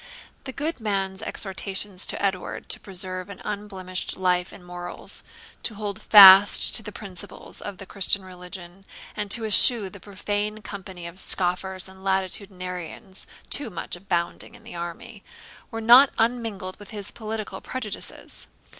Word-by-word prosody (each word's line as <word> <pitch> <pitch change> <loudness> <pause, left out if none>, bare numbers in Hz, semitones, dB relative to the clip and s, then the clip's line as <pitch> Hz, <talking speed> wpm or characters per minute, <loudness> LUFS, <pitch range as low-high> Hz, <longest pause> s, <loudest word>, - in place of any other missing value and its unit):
The 265 - -5
good 295 +4 -3
man's 195 -3 -2
ex 220 - -3
hortations 190 0 -1
to - - -2
Edward 190 -2 -3
to - - 0
preserve 185 -1 -2
an 200 - -10
unblemished 195 -3 -5
life 180 -1 0
and 180 - -14
morals, 175 0 -5 0.4
to 225 - -2
hold 205 -1 -5
fast 200 +2 +8
the 210 - -7
principles 195 -4 -9
of 205 -2 -7
the 195 - -9
Christian 195 0 +1
religion, 180 0 -10 0.3
and 210 -1 -3
to 225 +2 +2
eschew 215 -1 +8
the 200 - -11
profane 205 +2 -4
company 185 -3 -8
of 170 +2 -8
scoffers 185 +1 +1
and 190 0 -15
latitudinarians, 190 0 -4 0.2
too 280 -5 0
much 180 - -5
abounding 175 -2 -3
in - - -17
the - - -10
army, 200 +6 -8 0.5
were 225 - -6
not 245 +5 +8
unmingled 225 -5 -2
with 205 - -11
his 205 -2 -5
political 220 -1 -6
prejudices. 230 -6 -6
195 Hz, 145 wpm, -24 LUFS, 185-210 Hz, 0.5 s, fast